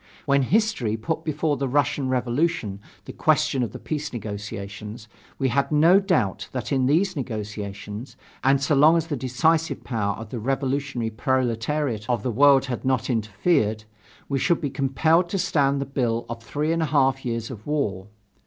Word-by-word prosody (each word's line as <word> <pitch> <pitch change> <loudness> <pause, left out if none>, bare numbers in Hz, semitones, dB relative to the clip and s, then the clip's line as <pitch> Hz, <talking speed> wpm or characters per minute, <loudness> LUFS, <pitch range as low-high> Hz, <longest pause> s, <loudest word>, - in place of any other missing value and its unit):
When 140 -2 +3
history 145 - +1
put 160 +8 -3
before 155 -1 0
the 135 +1 -1
Russian 140 0 +1
Revolution 125 -4 0 0.3
the - - -8
question 135 - +2
of 120 - -1
the - - -7
peace 150 -1 -4
negotiations, 105 0 -7 0.3
we 135 - +1
had 140 +5 0
no 165 +6 +6
doubt 165 - 0
that 130 +2 -4
in 130 -2 +2
these 175 +8 +2
negotiations, 110 -1 -6 0.3
and 135 +1 +4
so 140 +3 +1
long 150 +4 +6
as 165 - 0
the 160 -3 -3
decisive 150 +6 0
power 105 -5 -1
of 115 -1 -9
the 120 - -4
revolutionary 135 -1 -1
proletariat 120 +1 -1
of 120 -4 0
the 125 - -1
world 135 +3 +5
had 125 -3 -4
not 130 -1 0
interfered, 110 - +1 0.4
we 135 -1 -1
should 170 +5 +2
be 145 -5 -3
compelled 160 +6 +2
to 195 - -1
stand 140 -6 +1
the 140 - -2
bill 120 -4 -1
of 115 -1 -6
three 150 +7 -2
and 165 - 0
a - - +2
half 135 -2 +2
years 115 0 -3
of 110 -1 -10
war. 105 -11 -1
130 Hz, 175 wpm, -24 LUFS, 115-150 Hz, 0.4 s, no